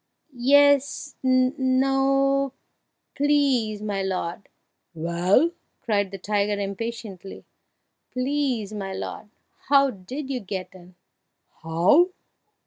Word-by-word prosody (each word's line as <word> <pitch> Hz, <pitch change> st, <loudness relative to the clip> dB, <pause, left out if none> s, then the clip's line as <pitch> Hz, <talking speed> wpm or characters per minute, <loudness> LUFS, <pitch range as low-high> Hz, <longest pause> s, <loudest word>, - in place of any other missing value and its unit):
"Yes 285 Hz, +2 st, +3 dB
no 270 Hz, +1 st, +2 dB, 0.6 s
Please, 270 Hz, -7 st, +1 dB
my 200 Hz, -2 st, -2 dB
lord 185 Hz, -1 st, -4 dB, 0.2 s
" -, -, -53 dB
"Well?" 175 Hz, -, +2 dB, 0.3 s
cried 205 Hz, -3 st, 0 dB
the 195 Hz, -, -7 dB
tiger 205 Hz, +1 st, -1 dB
impatiently. 200 Hz, -1 st, -6 dB, 0.6 s
"Please, 255 Hz, -5 st, -1 dB
my 195 Hz, -2 st, -5 dB
lord! 210 Hz, -, -6 dB, 0.4 s
how 275 Hz, -1 st, +5 dB
did 255 Hz, +9 st, -7 dB
you 255 Hz, -, -1 dB
get 190 Hz, -3 st, -6 dB
in?" 180 Hz, -1 st, -16 dB, 0.7 s
"How! 175 Hz, -, +4 dB
230 Hz, 95 wpm, -24 LUFS, 195-275 Hz, 0.7 s, how